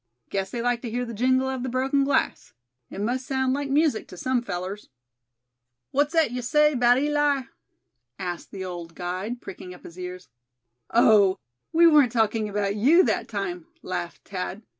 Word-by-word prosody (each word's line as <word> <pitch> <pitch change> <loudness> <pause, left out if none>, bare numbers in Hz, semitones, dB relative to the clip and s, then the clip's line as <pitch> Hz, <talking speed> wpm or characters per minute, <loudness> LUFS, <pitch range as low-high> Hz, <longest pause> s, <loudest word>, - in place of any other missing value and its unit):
Guess 195 -1 -1
they 235 +2 -4
like 245 -1 0
to 240 - -5
hear 245 +2 -2
the 235 - -7
jingle 255 +4 +2
of 265 -1 -3
the 260 - -3
broken 265 +3 +1
glass; 280 0 0 0.4
it - - -8
must 245 +5 -1
sound 265 -1 +1
like 285 0 -2
music 290 -3 +2
to 180 - -11
some 255 +4 0
fellers." 190 -2 -5 1.0
"What's 290 +3 +1
thet 325 -7 +3
ye 250 0 -3
say 300 +4 +3
'bout 245 -1 +4
Eli?" 290 -1 +1 0.7
asked 175 -2 -5
the 190 -1 -6
old 170 -2 -7
guide, 185 +7 -4
pricking 180 -1 -9
up - - -17
his 170 +2 -12
ears. 180 0 -7 0.6
"Oh! 210 -4 +5 0.3
we 335 +1 +5
weren't 295 -7 +6
talking 220 -2 +1
about 200 -1 -1
you 295 - +5
that - - 0
time," 355 -3 -4 0.2
laughed 175 -2 -5
Thad. 195 +2 -5
240 Hz, 175 wpm, -25 LUFS, 195-275 Hz, 1.0 s, weren't